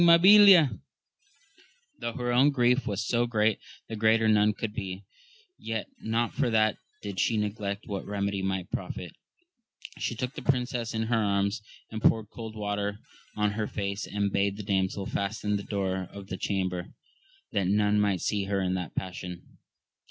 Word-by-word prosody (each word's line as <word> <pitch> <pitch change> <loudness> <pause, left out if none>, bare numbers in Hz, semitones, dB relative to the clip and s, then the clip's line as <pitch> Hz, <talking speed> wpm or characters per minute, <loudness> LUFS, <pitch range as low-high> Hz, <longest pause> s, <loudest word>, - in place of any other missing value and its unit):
Mabilia, 180 -1 +8 1.2
though 120 - -3
her 120 +1 -2
own 130 +4 +5
grief 125 -1 +2
was 100 0 -2
so 120 0 +1
great 110 -2 +1 0.3
that 110 - -5
greater 110 +1 +4
none 105 -1 +4
could 105 0 -5
be, 95 -2 -5 0.6
yet 110 -1 -3
not 115 +1 -1
for 135 -3 +1
that 110 -1 +3 0.3
did 100 -2 -5
she 115 - +2
neglect 105 -1 -3
what 100 -2 -4
remedy 100 -1 -2
might 95 -1 -2
profit; - - -5 0.9
she 120 - -2
took 125 +3 -3
the - - -7
princess 125 -3 -1
in 110 - 0
her 115 -1 +1
arms, 100 +1 0 0.3
and 110 -1 -5
poured* 110 -2 +2
cold 110 -2 -8
water 105 -1 -2 0.4
on 105 -1 +1
her 105 0 -2
face, 100 -1 -3
and 100 -1 -1
bade 100 0 +1
the 105 - -6
damsel 95 0 0
fasten 105 +1 -2
the 100 - -2
door 95 -2 -2
of 100 0 -10
the 95 - -4
chamber, 95 -2 -2 0.6
that 100 -3 0
none 105 +1 +3
might 100 -3 +1
see 100 -2 0
her 100 0 0
in 95 -1 0
that 90 -3 -4
passion. 90 -1 -6
105 Hz, 165 wpm, -28 LUFS, 100-115 Hz, 1.2 s, Mabilia